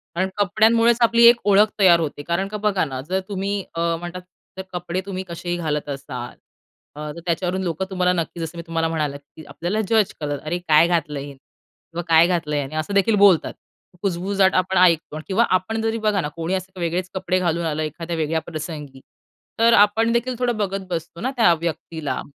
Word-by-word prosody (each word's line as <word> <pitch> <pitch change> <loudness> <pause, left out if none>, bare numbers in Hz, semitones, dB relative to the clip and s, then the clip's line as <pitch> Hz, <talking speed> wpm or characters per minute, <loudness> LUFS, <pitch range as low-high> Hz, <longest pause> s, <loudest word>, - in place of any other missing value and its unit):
कारण 185 +2 0
कपड्यांमुळेच 225 +4 +3
आपली 235 0 +4
एक 240 - +8
ओळख 205 +1 +5
तयार 180 -4 +6
होते. 145 -2 -4
कारण 170 +3 0
का 210 +1 -5
बघा 205 -3 +1
ना, 130 -3 -5
जर 190 +1 +1
तुम्ही 200 0 -2
अ, - - -3 0.2
म्हणतात 175 +1 -7 0.4
जर 190 - -4
कपडे 180 +1 -3
तुम्ही 190 -1 -4
कसेही 175 +1 -4
घालत 150 -3 -2
असाल 135 -3 -6 0.6
अ, 150 0 -6
तर - - -8
त्याच्यावरून 180 +2 -1
लोकं 175 +1 -2
तुम्हाला 180 -1 +1
नक्की 170 -1 -3
जसं 165 +1 -5
मी - - -4
तुम्हाला 165 0 0
म्हणालं, 150 -3 -2
की 145 +2 -16
आपल्याला 190 +6 -2
जज 220 -3 +3
करत. 145 -2 -3
"अरे 160 +3 -2
काय 160 +2 +6
घातलंय 150 -5 -1
हे? 145 - -9
किंवा 165 +4 -12
काय 165 0 +6
घातलंय 160 -4 -1
ह्यांनी?" 140 +2 -5
असं 155 +6 -3
देखील 200 +2 +3
बोलतात. 200 -5 +4 0.5
कुजबुजाट 190 +1 +1
आपण 185 +1 +1
ऐकतो. 165 -4 +3
किंवा 205 +4 +3
आपण 220 +5 -4
जरी 225 0 -1
बघा 205 -2 +2
ना, 150 - -3
कोणी 165 +2 -3
असं 190 0 -4
वेगळेच 175 +2 -2
कपडे 185 -1 0
घालून 170 -1 0
आलं, 155 -1 -2
एखाद्या 165 +3 -5
वेगळ्या 160 +1 0
प्रसंगी. 150 -4 -7 0.6
तर 230 +1 +5
आपण 225 +2 0
देखील 240 +2 0
थोडं 245 -2 0
बघत 195 -2 -3
बसतो 170 -1 -5
ना, 260 +3 -1
त्या 200 -7 +5
व्यक्तीला, 160 -2 -4
175 Hz, 195 wpm, -22 LUFS, 160-195 Hz, 0.6 s, एक